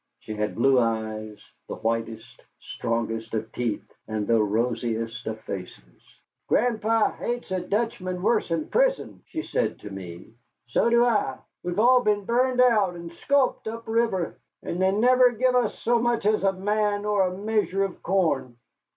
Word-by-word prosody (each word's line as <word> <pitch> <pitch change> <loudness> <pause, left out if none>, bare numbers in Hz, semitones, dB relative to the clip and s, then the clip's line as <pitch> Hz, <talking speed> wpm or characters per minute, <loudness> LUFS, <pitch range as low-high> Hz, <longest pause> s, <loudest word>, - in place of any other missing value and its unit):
She 110 - -8
had 105 0 -2
blue 130 +2 +4
eyes, 110 -2 -2 0.3
the - - -5
whitest, 115 +1 -4 0.2
strongest 115 -1 -3
of 110 0 -3
teeth, 120 -4 -3 0.2
and 110 -1 -2
the 115 0 +3
rosiest 115 +1 -1
of 110 0 -4
faces. 90 - -8 0.5
"Gran'pa 225 -2 +2
hates 240 -4 -4
a 185 - 0
Dutchman 185 -2 -2
wuss'n 170 -8 0
pizen," - - +1
she 320 - -4
said 110 - -1
to 105 - -8
me. 95 +1 -9 0.3
"So 120 - +1
do 235 +1 +5
I. 205 - +1 0.2
We've 175 +1 -4
all 250 +3 +5
been 210 -3 +1
burned 250 +2 +2
out 210 -8 +3
and 170 0 -9
sculped 270 +5 +1
up 230 +1 -6
river 225 -6 0 0.2
and 175 - -3
they 190 0 +4
never 250 +4 +4
give 255 +3 +2
us 250 -1 +1
so 235 0 +1
much 240 -2 0
as 215 0 +3
a 195 - +4
man 205 +2 0
or 205 -3 +2
a 180 0 -5
measure 205 -2 0
of 195 -2 -5
corn." 155 -10 0
185 Hz, 160 wpm, -25 LUFS, -, 0.5 s, do